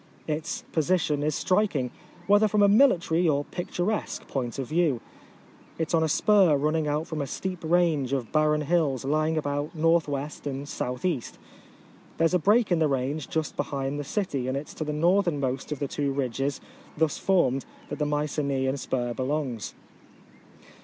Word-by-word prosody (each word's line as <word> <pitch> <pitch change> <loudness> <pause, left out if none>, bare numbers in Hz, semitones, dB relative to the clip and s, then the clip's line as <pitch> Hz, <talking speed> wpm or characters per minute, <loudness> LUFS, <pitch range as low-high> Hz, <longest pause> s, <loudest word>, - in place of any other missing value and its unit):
Its 155 +2 -3
position 160 -2 +1
is 150 0 0
striking, 185 - +1 0.3
whether 205 +3 +5
from 210 0 +3
a - - +7
military 180 -7 +4
or 145 -1 +1
picturesque 180 +3 -3
point 125 -4 -3
of 135 - -2
view. 155 -6 +1 0.8
It 160 -1 -2
is - - -5
on 165 - +4
a 160 - +1
spur 185 -1 +4
running 155 +2 0
out 150 +2 0
from 155 -3 -4
a 140 - -3
steep 185 +6 -5
range 160 -5 +2
of 130 -4 -2
barren 155 0 +2
hills 150 -5 +1
lying 155 +3 +1
about 145 +1 -2
KW. 155 -3 0
and 135 0 -3
S.R 135 -3 -3 1.2
There 165 - +3
is 165 - +2
a 180 - +4
break 210 +5 +3
in 175 - +3
the 160 - +3
range 135 +2 -2
just 160 -2 -2
behind 140 0 -2
the - - -3
city, 140 -5 -2
and 130 +1 -1
it 145 - -6
is - - -10
to - - -4
the 150 - -3
northernmost 150 -5 +1
of 150 - -2
the 140 - -2
two 140 0 -1
ridges 135 0 -2 0.4
thus 160 -1 +1
formed 135 -9 +2 0.3
that 145 - -5
the 150 - +1
Mycenaean 140 -2 -1
spur 120 -3 -2
belongs. 130 -3 -3
150 Hz, 175 wpm, -26 LUFS, 140-170 Hz, 1.2 s, a